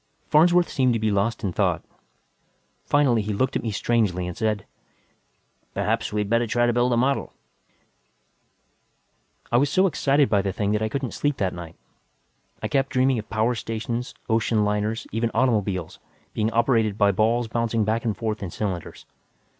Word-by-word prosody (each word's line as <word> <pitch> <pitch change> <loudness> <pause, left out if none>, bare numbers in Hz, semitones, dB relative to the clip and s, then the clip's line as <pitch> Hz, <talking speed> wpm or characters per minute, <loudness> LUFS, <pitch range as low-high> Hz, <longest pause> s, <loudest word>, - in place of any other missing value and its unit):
Farnsworth 175 +3 +5
seemed 130 -3 +1
to 115 - 0
be 110 -1 +1
lost 105 +4 0
in 95 -3 -1
thought. - - 0 1.0
Finally 135 -6 +3
he 105 +1 -3
looked 130 +6 0
at - - 0
me 115 - -3
strangely 105 -4 0
and 90 -1 -5
said, 110 -2 -1 1.1
"Perhaps 110 +1 -1
we 105 0 0
had 105 - -2
better 115 +2 +1
try 120 +2 +2
to 120 - +2
build 120 +1 +2
a 120 - +2
model." 135 +3 0 2.2
I 120 - +4
was 140 +3 +3
so 185 +6 +3
excited 145 -5 +2
by 100 -2 +2
the 95 -1 -2
thing 100 +1 -1
that 105 0 0
I 110 - 0
couldn't 135 +1 -3
sleep 145 -1 -1
that 95 -2 -1
night. 85 -2 -9 0.9
I - - 0
kept 135 -1 0
dreaming 130 -1 +2
of 110 - -9
power 115 +2 +1
stations, 115 +1 -4
ocean 110 -1 +1
liners, 105 +2 -1
even 115 +2 0
automobiles, 100 -9 0 0.3
being 110 0 0
operated 115 -3 +2
by 100 -1 +4
balls 115 +4 +1
bouncing 115 -1 0
back 110 +2 0
and 110 -4 -1
forth 110 -2 -3
in 95 - -4
cylinders. 90 -2 -5
115 Hz, 175 wpm, -24 LUFS, 105-120 Hz, 2.2 s, Farnsworth